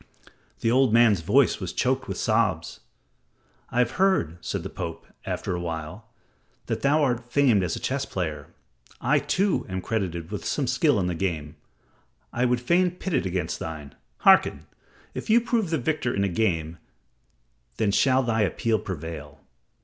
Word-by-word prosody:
The 115 - +2
old 130 -1 +4
man's 115 -5 +5
voice 115 - +3
was 90 -4 -4
choked 130 +6 0
with 95 - -4
sobs. - - 0 0.9
"I - - -5
have 125 -1 +3
heard," 90 - +2
said - - -3
the - - -5
Pope, - - -6 0.2
after - - -2
a - - -3
while, 85 +5 -6 0.6
"that - - -3
thou 145 +2 +3
art 120 -2 -1
famed 125 -8 +4
as 90 -3 -1
a - - -5
chess 135 +1 -1
player. 80 - -4 0.5
I, - - +2
too, 195 +1 +1
am 95 0 -3
credited 90 -5 -3
with 105 - -4
some 145 - -1
skill 125 0 +2
in 90 - 0
the 90 - -1
game. 80 -4 -3 0.8
I 125 +1 +1
would 125 -1 +1
fain 175 +8 +3
pit 180 +1 -6
it 130 - +1
against 90 -2 -2
thine. 80 -3 -7 0.3
Hearken! - - +5 0.5
If - - -6
thou 225 +2 +6
prove 230 -5 0
the 160 - +1
victor 140 -2 -1
in 100 - +1
the 100 - +1
game, 85 -5 -1 1.0
then 110 -3 +1
shall 130 +5 +3
thy 115 -2 +1
appeal 110 +3 +1
prevail." 80 -5 -7
110 Hz, 170 wpm, -25 LUFS, 85-130 Hz, 1.0 s, thou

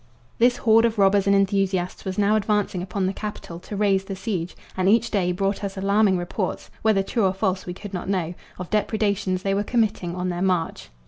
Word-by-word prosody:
This 245 +1 +4
horde 225 0 +4
of 230 -1 0
robbers 200 0 +4
and 200 - +5
enthusiasts 195 -2 0
was 190 -1 -4
now 205 +1 +3
advancing 205 -3 0
upon 190 +1 -2
the 190 - 0
capital 200 -5 -6
to 205 - -8
raise 195 -2 +2
the 195 -1 -5
siege, 185 -3 -4 0.2
and 190 0 +2
each 230 +2 +3
day 185 -4 +1
brought 195 +3 -1
us 195 -1 -4
alarming 200 0 +3
reports 180 +2 -4
whether 215 -3 +3
true 225 +3 -1
or 185 - 0
false 190 -1 -1
we 180 - -5
could 205 +1 -9
not 180 0 -4
know 180 -4 -1 0.2
of 180 -1 -7
depredations 205 -3 0
they 195 - +1
were 200 +1 +1
committing 210 -6 0
on 180 0 -2
their 175 0 -3
march. 180 -3 -1
195 Hz, 210 wpm, -24 LUFS, 185-210 Hz, 0.2 s, and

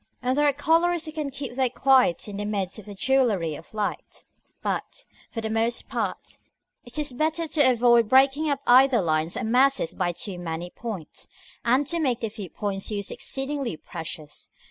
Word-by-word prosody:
And 255 +1 0
there 295 +1 +3
are - - +5
colorists 330 +4 +2
who 310 - -4
can 305 -2 -3
keep 275 -2 -6
their 260 0 +1
quiet 255 -8 +3
in 200 -1 -6
the 205 - -3
midst 200 -1 -3
of 215 - -13
a 205 - -8
jewellery 215 - +1
of 160 +3 -11
light; 210 -1 -4 0.4
but, - - -3 0.2
for 225 - -5
the 220 - -3
most 225 +2 -1
part, - - -4 0.4
it 240 - -6
is 295 -4 0
better 315 +5 0
to 290 -4 +4
avoid 235 -2 +4
breaking 275 +4 +4
up 280 -1 -1
either 255 0 +6
lines 160 0 0
or 250 - -3
masses 250 -3 +2
by 180 -1 0
too 180 +1 -6
many 170 0 -5
points, 215 -9 -7 0.4
and 255 +5 +3
to 340 +4 0
make 255 -6 0
the 225 - -2
few 205 -3 -8
points 195 +1 -3
used 200 -2 -3
exceedingly 270 - -2
precious. 160 -3 -8
240 Hz, 190 wpm, -25 LUFS, 200-275 Hz, 0.4 s, either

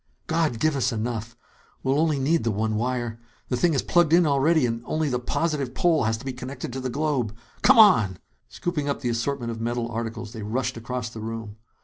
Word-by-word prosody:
"God 160 -7 0
give 155 +3 +2
us 130 -1 +1
enough! 115 0 -4 0.5
We'll 135 +2 +2
only 155 -2 +2
need 155 +5 +1
the 115 - +1
one 110 +1 0
wire. 120 0 -2 0.3
The 125 - +1
thing 160 +5 +2
is 135 - +1
plugged 175 -3 +3
in 175 0 +6
already 150 +1 +3
and 115 -1 -2
only 155 -1 0
the 125 -2 0
positive 140 0 -1
pole 165 -8 +3
has 110 0 +1
to 115 - -12
be 130 - -3
connected 125 0 -6
to 130 - -3
the 130 0 -3
globe. 135 -6 -1 0.3
Come - - +6
on!" 115 - +6 0.3
Scooping 150 -5 -3
up 140 - -2
the 125 - -1
assortment 120 +1 -2
of 115 0 -6
metal 120 0 -2
articles, 115 -1 -5
they 110 - -7
rushed 115 +6 -2
across 120 0 -4
the 115 - -9
room. 110 -1 -6
125 Hz, 215 wpm, -25 LUFS, 115-150 Hz, 0.5 s, in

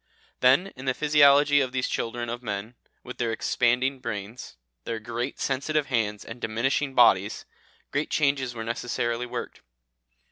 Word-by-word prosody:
Then 135 +10 +4
in 130 0 -9
the 130 -1 0
physiology 145 -1 +5
of 130 -2 -2
these 130 -1 0
children 120 +1 -3
of 120 +1 -5
men, 105 0 -5 0.3
with 125 - -9
their 115 -2 0
expanding 125 +4 +1
brains, 110 - -6 0.3
their 115 -1 -4
great 120 +4 -4
sensitive 140 +3 0
hands 105 -3 0
and 115 +1 -9
diminishing 130 +5 -1
bodies, 105 -4 +4 0.5
great 145 +2 -1
changes 140 -4 0
were 115 - -4
necessarily 120 +1 -2
worked. 120 0 -6
125 Hz, 145 wpm, -26 LUFS, 115-135 Hz, 0.5 s, physiology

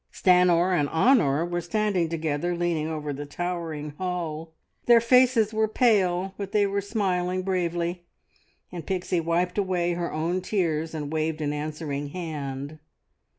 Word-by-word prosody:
Stanor 180 0 +4
and 145 -4 +1
Honor 165 - +3
were 175 0 -2
standing 185 -1 0
together 160 +1 -1
leaning 170 -3 -1
over 150 -2 -4
the 145 +1 -6
towering 165 -2 -4
hull; 165 -3 -4 0.4
their 240 -1 +8
faces 235 -2 +4
were 220 0 +2
pale, 195 -5 +2
but 200 0 -5
they 210 -1 +4
were 200 0 -1
smiling 185 -3 -1
bravely, 175 -1 -1 0.7
and 170 -4 -7
Pixie 185 -1 -1
wiped 175 +3 0
away 180 -3 0
her 170 0 -3
own 170 +4 -1
tears 165 -5 -1
and 150 -1 -4
waved 160 0 -1
an 150 -1 -1
answering 150 -1 -4
hand. 145 -3 -6
175 Hz, 145 wpm, -26 LUFS, 155-185 Hz, 0.7 s, their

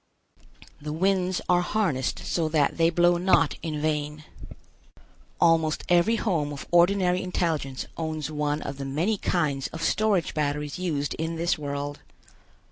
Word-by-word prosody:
The 150 +1 -5
winds 185 +1 +1
are 180 0 +4
harnessed 175 - 0
so 165 -2 0
that 150 -3 +1
they 165 0 +4
blow 175 +1 +3
not 175 -3 +3
in 155 -2 -3
vain. 150 -1 -2 1.2
Almost 165 -2 +3
every 175 +6 +4
home 170 -10 -1
of 145 - -7
ordinary 180 +1 +3
intelligence 160 -7 -2
owns 155 -2 -3
one 150 0 -1
of 140 - -5
the 140 - -5
many 170 +10 0
kinds 145 -6 0
of 160 0 -7
storage 210 -4 +1
batteries 150 0 -2
used 150 -6 -1
in 160 +1 -2
this 170 +2 +1
world. 145 -1 -4
160 Hz, 140 wpm, -26 LUFS, 150-175 Hz, 1.2 s, are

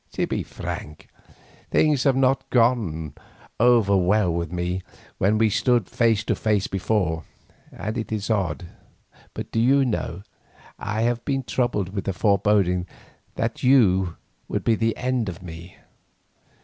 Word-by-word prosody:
To - - 0
be - - -2
frank, 75 0 -7 0.6
things 150 -3 +2
have 135 -2 +4
not 135 0 +1
gone 110 - +1 0.5
over 115 -4 +4
well 95 0 +2
with 85 -1 -3
me 90 +1 -2 0.4
when 105 +3 +3
we 110 -1 +3
stood 120 -2 +2
face 115 -3 +2
to - - 0
face 105 -3 0
before, 90 -4 -1 0.5
and 110 +2 -5
it 110 - -5
is 105 -2 -2
odd, 95 -3 -1 0.7
but - - -6
do 115 - 0
you 135 +4 +4
know, 100 -6 -3 0.6
I 110 +2 -2
have 120 0 0
been 135 -2 -1
troubled 120 -7 -1
with 100 -2 -4
a 95 - 0
foreboding 100 -2 +2 0.5
that 115 0 -2
you 95 -10 +4 0.3
would - - -2
be 115 - +3
the 115 0 0
end 125 -4 -1
of 90 0 -9
me. 85 +1 -10
105 Hz, 150 wpm, -24 LUFS, 90-120 Hz, 0.7 s, have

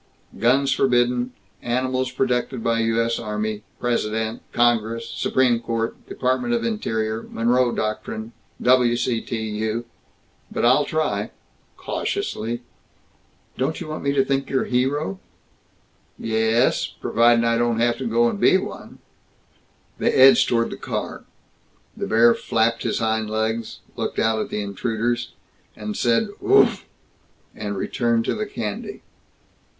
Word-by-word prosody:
Guns 130 +5 +3
forbidden. 125 -1 +2 0.3
Animals 130 +1 -1
protected 125 -2 -1
by 115 0 +1
U. 115 0 +1
S. 115 0 0
Army, 105 -1 -3 0.2
President, 110 -2 -1
Congress, 115 -1 +1
Supreme 125 0 +1
Court, 115 -1 -4
Department 240 - 0
of 235 - -1
Interior, 110 - -1
Monroe 120 +2 +2
Doctrine, 110 +1 -4 0.3
W. 125 -1 +4
C. 120 -1 0
T. 115 - -4
U. 110 +2 -2 0.7
But - - 0
I'll 130 +4 +5
try 110 -10 -1 0.5
cautiously." 120 +2 -3 1.0
"Don't 140 +5 -1
you - - -7
want 155 - -5
me 140 -1 +2
think 135 0 -1
you're 135 - +1
hero?" 125 -6 -1 1.0
"Ye 110 -1 -3 0.2
es, 120 +3 +2
providin' 115 0 +3
I 115 0 +2
don't 120 -1 +1
have 120 0 +1
to 130 - -3
go 120 +1 +3
and - - -2
be - - +5
one." - - -7 1.0
They - - +2
edged 135 +1 +6
toward 115 -1 +1
the - - -6
car. - - -5 0.7
The - - -4
bear 115 +1 +5
flapped 115 0 0
his - - -1
hind 110 -1 0
legs, 110 +1 -2
looked - - -3
out 110 0 +2
at - - -4
the 105 - -2
intruders, 115 +4 -2 0.6
said 120 - +1
"Oofflll!" 395 +1 +4 0.7
and 105 -2 -5
returned 115 +3 0
to - - 0
the 215 -1 -3
candy. 105 - -5
120 Hz, 135 wpm, -23 LUFS, 110-125 Hz, 1.0 s, edged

